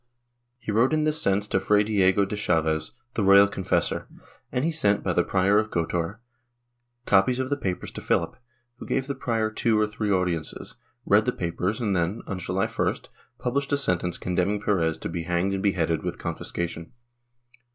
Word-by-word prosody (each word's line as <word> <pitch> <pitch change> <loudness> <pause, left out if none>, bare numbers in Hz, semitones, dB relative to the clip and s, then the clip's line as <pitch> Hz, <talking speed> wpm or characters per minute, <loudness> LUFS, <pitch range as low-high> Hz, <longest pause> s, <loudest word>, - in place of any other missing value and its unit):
He 120 -3 -5
wrote 115 +7 +3
in 155 0 +2
this 155 +1 +1
sense 100 -2 +1
to 95 - +2
Fray 105 +2 +3
Diego 100 -2 +3
de 100 - -4
Chaves, 80 -6 0 0.2
the 110 - -1
royal 100 +1 +7
confessor, 95 -2 -1 0.4
and 125 +4 0
he 165 - +1
sent, 105 -11 +1
by - - 0
the - - +3
Prior 100 +2 +3
of 110 0 -2
Gotor, 85 +3 -2 0.9
copies 100 +6 +3
of 130 +1 -3
the - - +3
papers 95 -10 -4
to - - -8
Philip, - - 0 0.4
who - - -9
gave 130 - 0
the 140 - -3
prior 115 -4 -1
two 110 0 +1
or 105 - +3
three 105 0 -3
audiences, 90 -4 -2 0.3
read - - +4
the - - +2
papers 90 +5 -2
and 105 -5 0
then, 90 +5 -1
on 95 -2 -4
July 90 +2 -1
1st, - - -2 0.3
published 140 +3 -2
a - - +4
sentence 90 -9 0
condemning 90 +3 0
Perez 85 -6 0
to - - -5
be 85 - -4
hanged 90 +2 0
and 95 - -2
beheaded, 85 -5 +1
with - - -4
confiscation. 85 -1 -4
100 Hz, 185 wpm, -25 LUFS, 90-110 Hz, 0.9 s, royal